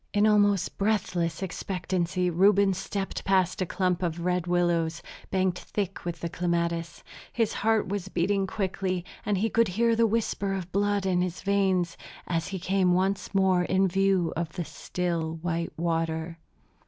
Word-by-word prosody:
In 205 +1 +4
almost 205 -3 +3
breathless 185 -5 0
expectancy 180 -1 -1
Reuben 195 +2 +4
stepped 195 +1 -4
past 190 -2 +2
a 185 - 0
clump 180 -1 0
of 170 -1 -2
red 180 -1 0
willows, 170 -2 +1 0.3
banked 185 -1 +1
thick 200 -4 -4
with 170 -1 -4
clematis. 170 -2 -1 0.3
His 225 -3 0
heart 220 0 +1
was 195 -1 -3
beating 195 +2 0
quickly, 185 -2 -2 0.2
and 205 -2 +2
he 215 +4 +1
could 230 +1 +3
hear 230 +5 +2
the 230 0 +4
whisper 205 -3 -1
of 190 - -2
the 175 - -20
blood 205 -1 +1
in 180 -2 +2
his 180 0 -3
veins, 190 -3 +1 0.3
as 165 -1 -1
he 195 - -4
came 185 0 +2
once 190 +2 -1
more 190 -2 +4
in 190 +2 +2
view 190 -2 +2
of 160 -1 -3
the 175 - -3
still, 170 -2 -3
white 170 -1 -1
water. 165 0 -1
185 Hz, 160 wpm, -27 LUFS, 170-195 Hz, 0.3 s, In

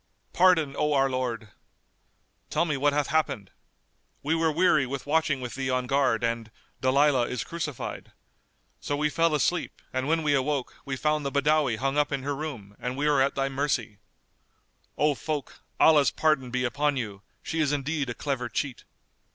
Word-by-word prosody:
"Pardon, 175 -6 +4
O 150 0 +2
our 135 -1 +3
lord!" 120 -4 -3 1.0
"Tell - - +1
me 150 -3 -1
what 145 +2 +2
hath 145 0 +1
happened." 140 -11 -1 0.7
"We 150 +3 +1
were 165 -1 +2
weary 155 -4 +3
with 135 +1 -5
watching 150 -2 +1
with 125 -1 -5
thee 135 -1 -3
on 130 0 0
guard 125 -3 +1
and 115 -1 -1
said:—Dalilah 130 +3 +1
is 125 - -2
crucified. 165 -6 -5 0.7
So 145 - -2
we 150 +1 +1
fell 165 -1 +2
asleep, 160 +5 -1
and 130 +1 -1
when 160 +1 +1
we 150 -1 +2
awoke, 140 -1 -1
we 135 -2 -3
found 150 +2 0
the 140 - -2
Badawi 145 -2 +2
hung 135 +4 0
up 150 - +1
in 140 -2 -2
her 145 +1 -2
room; 125 -10 -6
and 125 +1 -4
we 145 - 0
are 145 -2 +3
at 135 +1 +1
thy 135 0 0
mercy." 135 -6 -2 1.0
"O 150 0 +3
folk, 150 +1 -5 0.2
Allah's 150 -3 +6
pardon 155 -5 +1
be 125 +1 -1
upon 145 +3 0
you! 105 -5 -4 0.2
She 160 - -3
is 150 -2 +2
indeed 145 -1 -1
a 120 - -4
clever 130 -4 -3
cheat!" 130 +3 -3
140 Hz, 180 wpm, -27 LUFS, 130-150 Hz, 1.0 s, Allah's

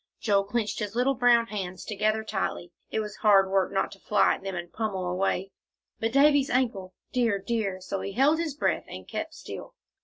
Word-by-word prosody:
Joel 200 -2 +2
clenched 215 0 -2
his 210 0 -4
little 250 +3 +3
brown 245 -2 +4
hands 190 -5 -5
together 215 +1 0
tightly. 190 -4 -3 0.2
It 220 - -1
was 210 -2 -6
hard 195 -2 +5
work 195 -1 +2
not 195 - 0
to 195 - -12
fly 210 0 +3
at - - -6
them 195 -1 -4
and 175 0 -6
pommel 205 -5 -2
away. 185 +1 -1 0.5
"But 225 0 0
Davie's 280 +1 +5
ankle 225 -8 -1 0.2
dear 235 -5 +2
dear!" 200 -2 -2
So 190 +1 -4
he 200 - -5
held 285 +7 +3
his 320 -4 -2
breath 300 - 0
and - - -9
kept - - -5
still. - - -9
210 Hz, 195 wpm, -27 LUFS, 195-240 Hz, 0.5 s, hard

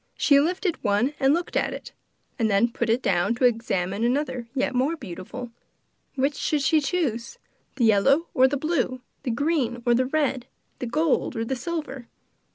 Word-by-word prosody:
She 280 -1 +5
lifted 350 +3 0
up - - -37
one 215 +6 +1
and 270 0 +4
looked 340 +3 -1
at - - +1
it, - - -10 0.5
and 225 -2 +2
then 210 +4 +3
put 235 -1 -2
it 235 +3 +1
down 195 +4 +1
to 250 - +2
examine 215 -4 0
another 255 -1 -1
yet 270 - 0
more 265 +6 +1
beautiful. 210 - -8 0.6
Which 275 +2 +1
should 290 0 -1
she 305 +3 +3
choose, 285 - -2 0.4
the 245 - +2
yellow 270 +10 +4
or 260 -4 +5
the 285 +2 -1
blue, 265 -4 -1 0.2
the 255 - -2
red 245 -3 -1
or 240 - +4
the 255 +2 +2
green, 270 -3 0 0.3
the - - -3
gold 300 +1 0
or 225 0 -2
the 265 - -2
silver? 275 -3 -5
255 Hz, 180 wpm, -25 LUFS, 230-290 Hz, 0.6 s, She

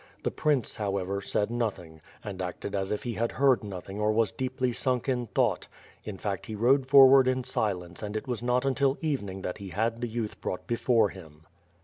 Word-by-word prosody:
The - - 0
prince, 145 -6 0
however, 100 -1 -2
said 105 +2 -1
nothing, 95 -9 -3 0.2
and 95 -2 -6
acted 90 +2 -5
as 95 -1 -1
if 105 - -2
he 120 - -3
had 115 +1 -1
heard 135 -3 +3
nothing 95 0 -7
or 105 0 +3
was 110 0 +2
deeply 130 -1 -2
sunk 125 +1 -1
in 125 -3 0
thought 120 -5 0 0.2
— - - -27
in 105 -3 -6
fact 100 -1 -4
he 110 - -5
rode 130 +5 +3
forward 135 -1 +8
in 130 0 +1
silence 90 -8 -2
and 105 0 -3
it 120 - -6
was 120 -3 -3
not 125 +2 +1
until 135 0 +2
evening 100 - -3
that 90 - -4
he 100 -1 -7
had 115 +4 -1
the 120 - -1
youth 110 -1 -4
brought 90 - -4
before 115 -2 +2
him. 80 -5 -13
110 Hz, 210 wpm, -28 LUFS, 100-125 Hz, 0.2 s, forward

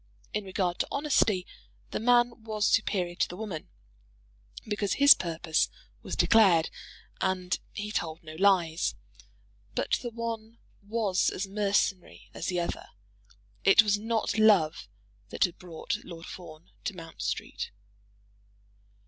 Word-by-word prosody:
In 210 - -2
regard 185 -2 -1
to - - 0
honesty, 225 -10 +2 0.5
the - - -2
man 240 0 +3
was 215 -2 -1
superior 185 -5 +1
to - - 0
the 180 - -8
woman, 195 -7 -6 1.0
because 210 -2 -1
his 285 +1 +9
purpose 165 -2 0 0.3
was - - -5
declared, 190 -8 +5 0.5
and 185 -1 0
he 210 0 -5
told 165 -5 -3
no 155 -1 -9
lies; 175 -2 +2 0.8
but - - 0
the 240 - -4
one 230 -1 -5 0.2
was 205 -2 +1
as 190 - -3
mercenary 200 -2 -1
as - - -5
the 180 -1 0
other. 170 - -3 0.8
It 195 +4 +7
was 205 -1 +2
not 220 -1 -1
love 195 - +4 0.4
that - - +1
had 175 - -1
brought 170 -3 -4
Lord 170 -1 -9
Fawn 165 -2 -11
to 200 - -2
Mount 165 - -10
Street. 100 -1 -3
195 Hz, 130 wpm, -29 LUFS, 175-220 Hz, 1.0 s, his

